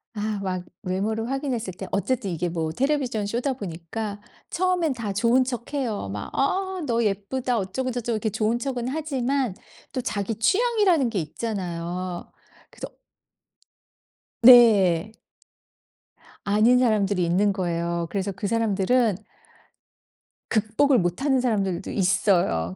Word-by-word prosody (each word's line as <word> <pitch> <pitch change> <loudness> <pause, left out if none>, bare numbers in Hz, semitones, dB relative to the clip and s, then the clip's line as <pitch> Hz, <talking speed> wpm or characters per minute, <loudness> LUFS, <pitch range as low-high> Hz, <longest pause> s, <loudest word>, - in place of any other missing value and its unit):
아 210 -1 -2
막 185 -2 -2 0.2
외모를 215 +5 -2
확인했을 255 -8 -2
때 190 +2 -8
어쨌든 230 +1 -1
이게 175 0 -2
뭐 160 -2 -2
텔레비전 260 - 0
쇼다 240 +6 -1
보니까 205 0 -6 0.3
처음엔 360 -4 +1
다 230 -5 -4
좋은 235 +5 +3
척해요. 245 - -3
막 100 +1 -5
"아 375 +6 0
너 235 -3 +1
예쁘다." 230 +5 -1
어쩌고저쩌고 240 +3 -2
이렇게 220 +1 -1
좋은 220 +3 0
척은 245 -1 -3
하지만 270 -6 -1 0.4
또 260 - -3
자기 215 -1 -2
취향이라는 380 - +2
게 225 - -4
있잖아요. 175 0 -4 0.4
그래서 - - -9 1.5
네. 215 -6 +7 1.3
아닌 215 +5 +4
사람들이 205 -6 +2
있는 195 +4 +2
거예요. 170 -2 -2
그래서 200 +1 -2
그 200 +2 -4
사람들은 225 +1 +2 1.3
극복을 225 +5 +2
못 175 +4 -1
하는 265 -3 +2
사람들도 195 -8 -1
있어요. 180 - +1
220 Hz, 275 characters per minute, -24 LUFS, 185-255 Hz, 1.5 s, 네